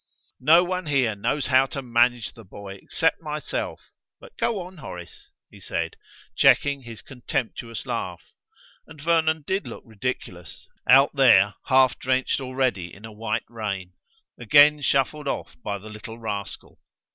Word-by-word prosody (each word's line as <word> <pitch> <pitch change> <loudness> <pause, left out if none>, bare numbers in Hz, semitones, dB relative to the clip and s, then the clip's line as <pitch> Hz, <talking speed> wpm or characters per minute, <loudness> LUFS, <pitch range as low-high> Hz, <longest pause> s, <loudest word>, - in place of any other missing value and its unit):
"No 160 +6 +6
one 180 -1 -3
here 135 -6 +2
knows 135 +8 -1
how 130 0 +4
to 135 0 -6
manage 120 -1 +2
the 115 - -14
boy 100 0 -10
except 160 +1 0
myself 150 -1 -5 0.3
But - - -15
go 230 -3 0
on, 180 +1 -10
Horace," 90 - -10 0.2
he - - -14
said, - - -3 0.4
checking 140 -1 +4
his 115 -3 -10
contemptuous 120 -3 -4
laugh; 95 -9 -4 0.6
and 150 - -14
Vernon 160 0 +1
did 190 +4 -2
look - - -9
ridiculous, 100 -7 -6 0.2
out 135 +3 +6
there 105 -7 +6
half 130 -1 +4
drenched 130 +1 0
already 130 -9 -1
in 100 +5 -12
a 110 - -9
white 110 +1 -3
rain, 100 -5 -5 0.5
again 145 +5 +6
shuffled 140 +2 0
off - - -4
by 100 -3 -3
the 105 +2 -11
little 110 +2 -9
rascal. 105 -3 -6
125 Hz, 145 wpm, -24 LUFS, 110-145 Hz, 0.6 s, No